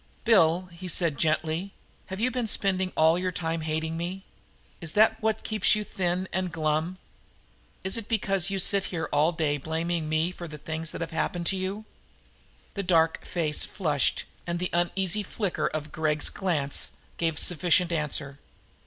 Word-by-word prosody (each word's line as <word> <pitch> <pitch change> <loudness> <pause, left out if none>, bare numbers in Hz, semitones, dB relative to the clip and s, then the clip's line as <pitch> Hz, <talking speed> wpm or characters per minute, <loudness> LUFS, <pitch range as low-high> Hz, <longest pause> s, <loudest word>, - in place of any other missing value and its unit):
"Bill," 185 -5 +4
he 175 +2 -8
said 165 -3 +1
gently, 160 +4 0 0.3
"have 190 +1 -6
you 250 +3 +1
been 250 -2 -1
spending 190 -3 +1
all 160 +2 +4
your 185 0 -1
time 165 -1 -2
hating 160 +1 -2
me? 180 +3 -5 0.6
Is 165 -2 -3
that 220 +1 +4
what 220 0 0
keeps 215 -1 +3
you 210 - -2
thin 185 -2 -2
and 185 -1 -1
glum? 155 +3 -1 0.9
Is 190 +4 0
it 225 -2 -6
because 195 -4 +1
you 195 - -2
sit 195 +1 +4
here 160 -3 -3
all 150 +3 +4
day 155 -3 0
blaming 160 +2 -2
me 160 +3 +1
for 175 -1 -8
all - - -8
the 150 - -8
things 160 +2 -4
that - - -5
have 165 0 -4
happened 170 +1 -2
to - - -2
you?" 190 +3 -4 0.9
The 200 - -2
dark 165 -3 +2
flush 155 -2 +1 0.2
and 170 0 -1
the 180 +1 -3
uneasy 180 +3 +1
flicker 200 -1 -2
of 155 -1 -4
Gregg's 155 -1 +1
glance 155 -8 +1 0.2
gave 165 -2 0
a - - +3
sufficient 175 0 +3
answer. 145 -3 -2
175 Hz, 170 wpm, -27 LUFS, 160-190 Hz, 0.9 s, Bill